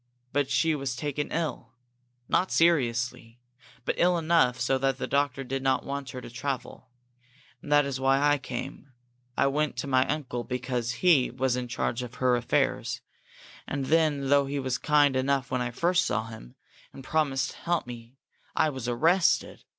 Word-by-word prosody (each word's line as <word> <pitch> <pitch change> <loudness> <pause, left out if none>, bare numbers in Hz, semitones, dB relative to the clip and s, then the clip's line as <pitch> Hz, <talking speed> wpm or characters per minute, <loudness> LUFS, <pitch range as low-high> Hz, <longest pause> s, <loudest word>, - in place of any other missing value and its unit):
But 145 -1 +1
she 140 +5 +2
was 135 -3 -3
taken 145 +1 -3
ill. 155 -7 -3 0.5
Not 185 - +1
seriously, 125 -7 +1 0.5
but - - +1
ill 175 0 +4
enough 160 -7 +2
so 130 +1 +1
that 135 0 +1
the - - -3
doctor 140 -1 0
did 135 +1 -3
not 130 -1 +1
want 140 -1 -4
her 130 - -7
to - - -9
travel. 130 0 -5 0.7
And 145 - -9
that 145 -1 +5
was 135 -2 -3
why 135 +1 +3
I 145 0 +3
came. 130 +1 -7 0.4
I - - +3
went 150 +2 0
to - - -3
my 130 -1 +2
uncle, 135 -5 -3
because 125 -2 -2
he 155 -8 +5
was 130 0 0
in 125 -1 -3
charge 120 0 -2
of 125 0 -7
her 125 -1 +2
affairs. 120 0 0 0.7
And 140 -1 -3
then, 145 -2 +2
though 140 -1 +4
he 140 +1 -3
was 130 -2 -2
kind 145 -1 +3
enough 130 0 0
when 125 -1 0
I 120 - -1
first 175 +9 +1
saw 110 +2 -1
him, 110 - -11 0.4
and 135 - -11
promised 135 -3 0
to - - -14
help 175 0 -1
me, 120 +1 -10 0.4
I 155 - +3
was 130 -4 -5
arrested. 165 +10 +2
135 Hz, 180 wpm, -27 LUFS, 125-145 Hz, 0.7 s, that